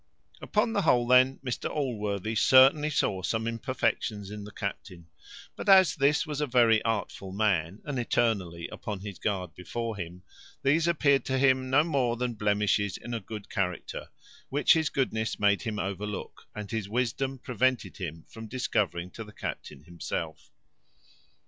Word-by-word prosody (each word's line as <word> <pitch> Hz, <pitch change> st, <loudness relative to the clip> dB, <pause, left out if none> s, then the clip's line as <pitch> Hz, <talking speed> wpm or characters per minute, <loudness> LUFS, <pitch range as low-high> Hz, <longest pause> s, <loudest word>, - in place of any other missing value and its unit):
Upon 225 Hz, -, 0 dB
the 200 Hz, -, +2 dB
whole, 125 Hz, -8 st, +3 dB
then, 130 Hz, +2 st, +5 dB
Mr 125 Hz, -, -2 dB
Allworthy 110 Hz, -7 st, -2 dB
certainly 130 Hz, +7 st, +6 dB
saw 95 Hz, -9 st, 0 dB
some 110 Hz, +5 st, -1 dB
imperfections 115 Hz, -3 st, -2 dB
in 105 Hz, -1 st, -7 dB
the 105 Hz, -, -10 dB
captain; 95 Hz, -4 st, -6 dB, 0.5 s
but -, -, -4 dB
as 190 Hz, -5 st, +7 dB
this 145 Hz, 0 st, +2 dB
was 150 Hz, -1 st, -4 dB
a 150 Hz, -, 0 dB
very 120 Hz, -3 st, +4 dB
artful 100 Hz, -3 st, -3 dB
man, 95 Hz, -3 st, 0 dB
and 140 Hz, -3 st, -3 dB
eternally 95 Hz, -8 st, 0 dB
upon 105 Hz, -3 st, -6 dB
his 100 Hz, -2 st, -8 dB
guard 95 Hz, -6 st, -2 dB
before 115 Hz, +4 st, -4 dB
him, 90 Hz, 0 st, -7 dB, 0.4 s
these 155 Hz, +5 st, +3 dB
appeared 140 Hz, -6 st, +3 dB
to 130 Hz, -, 0 dB
him 130 Hz, -1 st, +3 dB
no 140 Hz, +3 st, +5 dB
more 130 Hz, -7 st, 0 dB
than 125 Hz, 0 st, -1 dB
blemishes 105 Hz, -2 st, +1 dB
in 120 Hz, -, -7 dB
a 115 Hz, -, -1 dB
good 105 Hz, 0 st, -8 dB
character, 90 Hz, -3 st, -3 dB, 0.4 s
which 145 Hz, +2 st, +4 dB
his 160 Hz, -3 st, +1 dB
goodness 110 Hz, -5 st, -1 dB
made 100 Hz, -1 st, +3 dB
him 110 Hz, -3 st, -3 dB
overlook, 100 Hz, +1 st, -5 dB
and 105 Hz, -1 st, -6 dB
his 110 Hz, -3 st, -3 dB
wisdom 125 Hz, +3 st, -1 dB
prevented 125 Hz, 0 st, -1 dB
him 80 Hz, +1 st, -6 dB
from 115 Hz, -1 st, -10 dB
discovering 105 Hz, -7 st, -1 dB
to 115 Hz, -, -7 dB
the 105 Hz, -, -13 dB
captain 75 Hz, -7 st, -7 dB
himself. 85 Hz, +1 st, -5 dB
115 Hz, 160 wpm, -28 LUFS, 100-130 Hz, 0.5 s, as